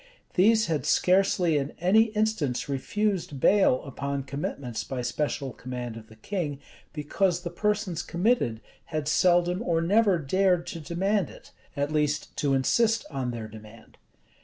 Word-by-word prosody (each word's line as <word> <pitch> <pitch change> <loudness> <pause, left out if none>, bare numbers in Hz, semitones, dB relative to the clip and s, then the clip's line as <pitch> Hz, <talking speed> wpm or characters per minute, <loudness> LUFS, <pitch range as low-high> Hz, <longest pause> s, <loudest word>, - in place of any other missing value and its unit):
These 220 +4 +4
had 160 -5 -1
scarcely 180 -4 +3
in 140 +1 -4
any 195 +6 +5
instance 210 - 0
refused 165 +2 -2
bail 190 -6 +4
upon 140 0 -4
commitments 135 -3 -4
by 130 -2 -4
special 135 +1 -2
command 125 -2 -6
of 110 -1 -10
the 110 - -16
king, 145 - -4 0.3
because 170 +4 0
the 175 -1 -5
persons 195 -2 -1
committed 170 - 0 0.2
had 155 -3 -3
seldom 175 +3 +3
or 170 -7 +1
never 200 +3 +3
dared 180 +3 +1
to 165 - -6
demand 185 +4 0
it, - - -15 0.3
at 145 +1 -1
least 150 -1 -1
to 140 -2 +1
insist 225 - +2
on 135 -3 -2
their 115 -2 -5
demand. 110 +1 -14
160 Hz, 145 wpm, -27 LUFS, 135-190 Hz, 0.3 s, any